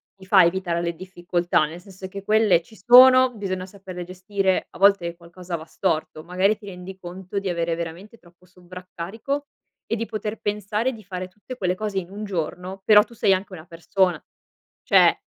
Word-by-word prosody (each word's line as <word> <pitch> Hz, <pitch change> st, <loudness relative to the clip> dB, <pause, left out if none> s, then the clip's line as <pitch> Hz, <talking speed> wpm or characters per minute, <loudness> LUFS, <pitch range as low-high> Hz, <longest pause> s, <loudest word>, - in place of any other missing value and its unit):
ti 190 Hz, -1 st, -15 dB
fa 190 Hz, 0 st, +6 dB
evitare 170 Hz, -1 st, -1 dB
le 170 Hz, 0 st, -2 dB
difficoltà, 175 Hz, -2 st, 0 dB
nel 160 Hz, +3 st, -8 dB
senso 190 Hz, 0 st, -10 dB
che 195 Hz, +1 st, -8 dB
quelle 210 Hz, -4 st, +4 dB
ci 220 Hz, -, -18 dB
sono, 255 Hz, +3 st, +7 dB
bisogna 185 Hz, -3 st, -4 dB
saperle 185 Hz, -2 st, -9 dB
gestire. 185 Hz, +1 st, -1 dB
A -, -, -13 dB
volte 195 Hz, -4 st, +4 dB
qualcosa 175 Hz, +1 st, -8 dB
va 160 Hz, -1 st, -7 dB
storto, 155 Hz, -2 st, -2 dB
magari 185 Hz, +5 st, +1 dB
ti 210 Hz, -, -15 dB
rendi 185 Hz, 0 st, -9 dB
conto 185 Hz, +2 st, -6 dB
di 195 Hz, -1 st, -4 dB
avere 170 Hz, -1 st, -1 dB
veramente 170 Hz, +7 st, -7 dB
troppo 175 Hz, -2 st, -23 dB
sovraccarico 185 Hz, +9 st, -6 dB, 0.4 s
e -, -, -2 dB
di 230 Hz, 0 st, -3 dB
poter 215 Hz, 0 st, -5 dB
pensare 210 Hz, +4 st, -1 dB
di 220 Hz, -2 st, -12 dB
fare 185 Hz, -1 st, -6 dB
tutte 210 Hz, +7 st, -11 dB
quelle 185 Hz, -5 st, 0 dB
cose 205 Hz, -1 st, -2 dB
in 175 Hz, -2 st, -9 dB
un 205 Hz, +2 st, -7 dB
giorno, 180 Hz, +1 st, -4 dB
però 210 Hz, -1 st, +7 dB
tu 235 Hz, -, -17 dB
sei 200 Hz, -3 st, +3 dB
anche 190 Hz, +1 st, -3 dB
una 160 Hz, -3 st, -10 dB
persona, 170 Hz, 0 st, 0 dB, 0.6 s
cioè -, -, +5 dB
185 Hz, 185 wpm, -23 LUFS, 175-205 Hz, 0.6 s, sono